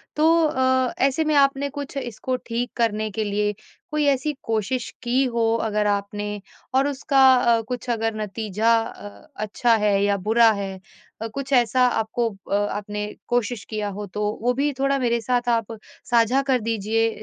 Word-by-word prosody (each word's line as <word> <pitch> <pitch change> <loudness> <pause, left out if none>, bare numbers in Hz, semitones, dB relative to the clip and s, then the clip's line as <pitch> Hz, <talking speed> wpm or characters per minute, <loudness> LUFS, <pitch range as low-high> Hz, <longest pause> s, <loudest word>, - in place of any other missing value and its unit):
तो 305 - +2 0.2
अ, 260 -2 +1
ऐसे 275 +4 +1
में 305 -1 +1
आपने 280 0 +3
कुछ 285 0 -6
इसको 255 0 -3
ठीक 240 +1 -2
करने 215 -2 0
के 220 +3 -2
लिए 210 0 0 0.4
कोई 300 -1 +1
ऐसी 280 +2 +1
कोशिश 225 +2 -1
की 250 +2 +2
हो 225 -1 +2
अगर 210 -1 0
आपने, 205 0 -2 0.3
और 270 +2 +3
उसका 275 -1 +3
अ, 235 -2 +3
कुछ 250 0 -5
अगर 225 -1 0
नतीजा 215 +1 0
अ, 205 0 -10
अच्छा 215 +3 +1
है 200 -1 +3
या 200 0 +2
बुरा 225 +1 +6
है 195 -2 -5 0.4
अ, 225 - -2
कुछ 275 +4 -5
ऐसा 250 0 +4
आपको 230 0 -1 0.2
अ, - - +3
आपने 205 0 -2 0.2
कोशिश 240 -2 -1
किया 215 -2 -2
हो, 205 +1 -5
तो 210 +2 -2
वो 245 +2 +2
भी 280 +3 0
थोड़ा 275 0 +2
मेरे 235 -2 +1
साथ 245 +1 0
आप 230 -1 0 0.3
साझा 240 +3 +4
कर 255 - +3
दीजिए। 225 0 0
230 Hz, 170 wpm, -23 LUFS, 210-255 Hz, 0.4 s, बुरा